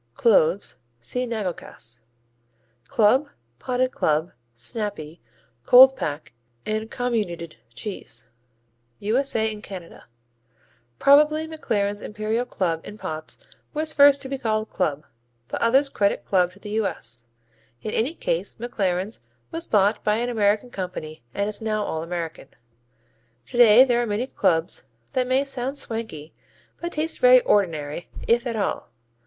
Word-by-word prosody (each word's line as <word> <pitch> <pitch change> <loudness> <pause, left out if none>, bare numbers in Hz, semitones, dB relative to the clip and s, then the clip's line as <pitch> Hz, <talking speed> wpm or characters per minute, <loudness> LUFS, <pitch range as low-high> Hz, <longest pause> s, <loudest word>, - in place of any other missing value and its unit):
Cloves 195 -4 +3 0.2
see 250 - -3
Nagelkäse. 180 - -5 0.9
Club, 255 +7 +3 0.3
Potted 255 0 0
Club, 155 +2 0 0.2
Snappy, 175 - -5 0.4
Cold 260 - +8
pack 150 - -4 0.3
and 215 +1 -2
Comminuted 210 -11 -2 0.2
cheese 205 - -6 0.7
U.S.A. 220 0 0
and 210 - -9
Canada 185 -5 -10 0.9
Probably 300 +3 +5
McLaren's 205 -10 -2
Imperial 215 +3 -2
Club 170 -7 -1
in 210 - -9
pots 155 -5 -6 0.4
was 310 +1 0
first 285 -1 +6
to - - -5
be 270 0 -4
called 215 -2 -1
club, 155 -5 -1 0.4
but - - -4
others 265 +5 +4
credit 200 -7 0
club 180 -2 +2
to 200 - -18
the 210 0 -8
U.S. 120 - -3 0.6
In 215 - -3
any 260 +11 0
case - - -2
McLaren's 200 -3 -2 0.3
was 165 - -4
bought 205 0 +2
by 210 - +2
an 240 +2 -1
American 215 +1 +1
company 180 - -6
and 200 - 0
is 210 0 -5
now 215 -1 -1
all 160 -5 -3
American. 165 -3 -5 1.0
Today 240 - +7
there 240 -2 +2
are 240 - -1
many 210 +4 -1
clubs 175 -9 0 0.3
that 255 -1 +1
may 260 +2 +2
sound 270 0 -4
swanky 220 - -5 0.5
but 345 0 -3
taste 315 +2 -2
very - - +7
ordinary, 165 - 0 0.2
if 240 +2 +3
at 230 - -2
all. 200 - -2
215 Hz, 135 wpm, -24 LUFS, 180-250 Hz, 1.0 s, Cold